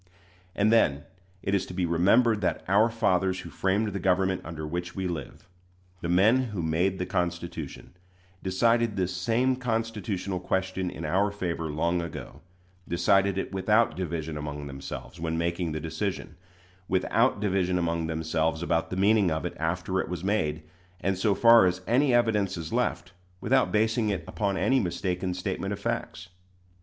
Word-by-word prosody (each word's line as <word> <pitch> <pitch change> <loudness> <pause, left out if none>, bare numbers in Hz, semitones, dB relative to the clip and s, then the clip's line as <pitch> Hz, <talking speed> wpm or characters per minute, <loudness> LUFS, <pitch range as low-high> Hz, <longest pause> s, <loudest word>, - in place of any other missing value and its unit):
And 105 +2 +3
then 75 -10 +3 0.4
it 100 - -1
is 100 -2 +2
to 90 - -8
be 90 -1 0
remembered 105 +7 +3
that 90 - -1
"our 105 +5 +4
fathers 95 -4 +1
who - - -10
framed 100 +3 0
the 100 -1 -4
government 95 +1 +1
under 80 -1 -6
which 85 +2 -4
we 95 -1 -2
live" 85 0 -6 0.5
the 85 - -3
men 110 +9 +4
who 105 -7 -4
made 85 +4 +1
the 90 - -2
Constitution 85 -5 -4 0.5
decided 115 +4 +2
this 90 -1 -1
same 115 +8 +1
constitutional 110 -6 -2
question 95 0 -1
in - - -7
our 100 +3 +2
favor 85 -5 -3
long 85 +4 0
ago: 85 -2 -8 0.5
decided 95 +3 +2
it 95 - -3
without 105 +4 +2
division 80 -4 -3
among 75 0 -5
themselves 70 +1 -8
when 80 0 -2
making 85 0 -1
the 80 - -3
decision; 80 +2 -4 0.5
without 105 +6 +2
division 95 -3 +1
among 85 -1 -1
themselves 80 0 -1
about 80 -1 0
the - - -4
meaning 100 0 +4
of 80 +1 -2
it 90 - -3
after 90 +3 -1
it - - -6
was 90 -1 -4
made, 80 -7 0 0.4
and, 95 0 0
so 100 +2 +1
far 115 -4 +7
as 90 +1 -1
any 130 +4 +3
evidence 105 -6 +2
is 80 -1 -6
left, 90 - -1 0.3
without 130 +4 +2
basing 110 +1 +2
it 95 -5 -2
upon 100 -2 -1
any 130 +6 +3
mistaken 90 -1 -2
statement 90 - -3
of - - -3
facts. - - -4
95 Hz, 165 wpm, -27 LUFS, 85-105 Hz, 0.5 s, far